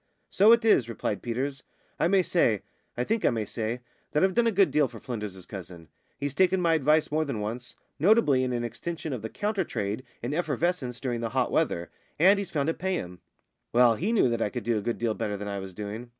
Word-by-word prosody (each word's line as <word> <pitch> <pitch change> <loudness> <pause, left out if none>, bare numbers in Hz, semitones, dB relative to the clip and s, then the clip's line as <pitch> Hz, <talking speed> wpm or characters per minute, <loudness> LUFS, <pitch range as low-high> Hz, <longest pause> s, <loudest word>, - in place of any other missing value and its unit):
"So 205 +4 +6
it 235 0 +5
is!" 130 - +4
replied 105 -2 -3
Peters. 130 +3 -3 0.4
"I - - +3
may 190 0 +4
say 115 - +2 0.3
I 120 - +1
think 225 - -1
I - - +5
may 110 -3 -1
say 115 +3 -3 0.3
that 150 - +3
I've 190 0 +3
done 240 +2 +3
a - - +3
good 195 -2 +3
deal 150 -2 +3
for 115 -2 -11
Flynders's 105 -7 -6
cousin. 90 -5 -9 0.3
He's 140 -1 -3
taken 185 +3 +3
my 170 -2 +3
advice 155 0 +3
more 155 +1 +2
than 140 -8 -3
once, 115 +4 -5 0.2
notably 160 - +4
in 130 - -1
an 120 -1 -1
extension 150 +7 -5
of 125 - -4
the 110 - -5
counter 205 - -1
trade 105 -4 -3 0.2
in 125 +4 -2
effervescents 155 -5 -1
during 120 -3 -2
the 115 - -2
hot 125 - +2
weather, 85 - 0 0.3
and 195 +5 +5
he's 200 - -4
found 145 -2 -1
it 165 - -1
pay 190 0 0
him. 90 - -6 0.5
Well, 120 -1 +6
he 185 - -1
knew 225 - +4
that 115 -1 -1
I 105 - +1
could - - -5
do 115 +1 +1
a - - -5
good 120 +3 -2
deal 115 -2 0
better 105 -2 -3
than 105 +1 -6
I 100 -1 -3
was 95 0 -7
doing. 105 +5 -6
125 Hz, 235 wpm, -27 LUFS, 110-170 Hz, 0.5 s, So